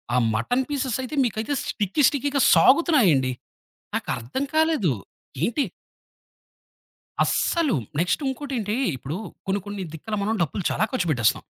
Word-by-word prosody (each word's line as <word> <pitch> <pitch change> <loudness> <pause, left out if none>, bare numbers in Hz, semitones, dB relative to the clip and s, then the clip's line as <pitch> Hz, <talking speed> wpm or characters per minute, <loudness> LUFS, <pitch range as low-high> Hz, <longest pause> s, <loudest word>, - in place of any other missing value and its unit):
ఆ - - +4 0.2
mutton 245 - +1
pieces 265 -4 -1
అయితే 255 +4 -5
మీకైతే 225 +5 -2
స్టిక్కీ, 205 +7 -1
స్టిక్కీగా 285 0 0
సాగుతున్నాయండి. 215 - +4 0.6
నాకర్థం 130 - -3
కాలేదు. 315 - +3 0.5
ఏంటి 240 +8 +1 1.6
అస్సలు. 335 -6 +1 0.2
నెక్స్ట్ 180 - +1
ఉంకోటేంటి 260 -6 -2 0.2
ఇప్పుడు 135 +6 -5 0.3
కొన్ని 195 +1 +1
కొన్ని 205 -1 -5
దిక్కుల 215 +7 -4
మనం 220 +2 0
డబ్బులు 170 +4 -1
చాలా 205 - 0
ఖర్చుపెట్టేస్తాం. 155 - +1
220 Hz, 115 wpm, -24 LUFS, 175-280 Hz, 1.6 s, ఆ